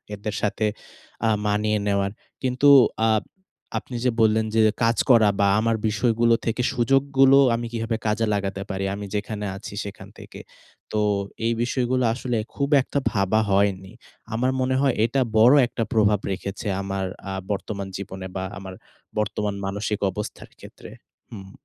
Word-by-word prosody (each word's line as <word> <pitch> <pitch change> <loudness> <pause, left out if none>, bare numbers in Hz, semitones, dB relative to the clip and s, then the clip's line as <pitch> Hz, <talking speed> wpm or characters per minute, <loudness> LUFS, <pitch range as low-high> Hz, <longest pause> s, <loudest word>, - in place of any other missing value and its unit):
এদের 105 +1 -5
সাথে 105 +1 0 0.6
আ - - +3 0.2
মানিয়ে 105 +1 +1
নেওয়ার। 100 -1 +1 0.3
কিন্তু, 130 +2 +1 0.4
আ - - +3 0.7
আপনি 125 - -10
যে 125 - +3
বললেন 110 0 +3
যে, 110 - +5 0.2
কাজ 115 0 +2
করা 115 -4 +6
বা 100 - +4
আমার 115 +1 +1
বিষয়গুলো 115 +2 +2
থেকে 115 +2 -1
সুযোগগুলো 135 +2 +4 0.2
আমি 120 +1 -4
কিভাবে 115 0 -2
কাজে 110 +2 +1
লাগাতে 100 -1 -2
পারি 95 -1 -2
আমি 100 0 -6
যেখানে 105 0 -3
আছি 100 - -9
সেখান 100 -1 -9
থেকে। - - -11 0.5
তো, 110 - 0 0.5
এই 115 - +2
বিষয়গুলো 125 +1 0
আসলে 120 -1 -2 0.2
খুব 140 -1 -1
একটা 140 - -2
ভাবা 100 +1 +1
হয়নি। 95 -1 +1 0.4
আমার 125 +3 +1
মনে 130 0 +1
হয় 135 -3 +3
এটা 130 +4 0 0.2
বড় 120 +5 +7
একটা 120 -1 -3
প্রভাব 105 -2 +3
রেখেছে 95 +2 -5
আ - - -2
আমার 95 -1 -3 0.5
বর্তমান 100 0 -4
জীবনে 95 -1 -7
বা 95 - -2
আমার 95 0 -8 0.4
বর্তমান 105 -1 -2
মানসিক 100 +1 -2
অবস্থার 105 +3 -7
ক্ষেত্রে। - - -12 0.4
হুম। 95 -3 -10
110 Hz, 150 wpm, -23 LUFS, 100-120 Hz, 0.7 s, বড়